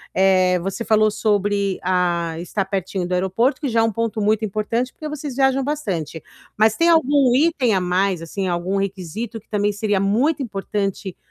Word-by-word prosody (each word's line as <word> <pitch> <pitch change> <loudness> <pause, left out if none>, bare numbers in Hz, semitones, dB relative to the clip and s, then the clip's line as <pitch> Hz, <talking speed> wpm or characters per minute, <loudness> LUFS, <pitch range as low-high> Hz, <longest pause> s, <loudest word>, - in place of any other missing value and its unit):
eh, 185 -1 +4
você 195 +6 -4
falou 215 -1 +3
sobre, 205 -2 0
ah, 175 -2 0
estar 190 +3 -2
pertinho 190 -2 -3
do 180 - -3
aeroporto 190 +9 +1
que 280 - -1
já 230 0 +2
é - - +3
um 225 - +1
ponto 230 0 -2
muito 215 +1 +1
importante, 215 +4 -2
porque 310 - -8
vocês 290 -3 -6
viajam 270 0 +2
bastante. 190 - -3 0.3
Mas 220 0 +4
tem 335 +1 +3
algum 285 -5 +4
item 275 - +2
a 190 - +2
mais, 180 -1 0
assim, 190 +3 -4
algum 180 +2 -1
requisito 195 +4 -4
que 215 - -27
também 205 -1 +1
seria 205 -1 0
muito 250 +10 +1
importante 195 -4 -3
205 Hz, 180 wpm, -21 LUFS, 190-235 Hz, 0.3 s, eh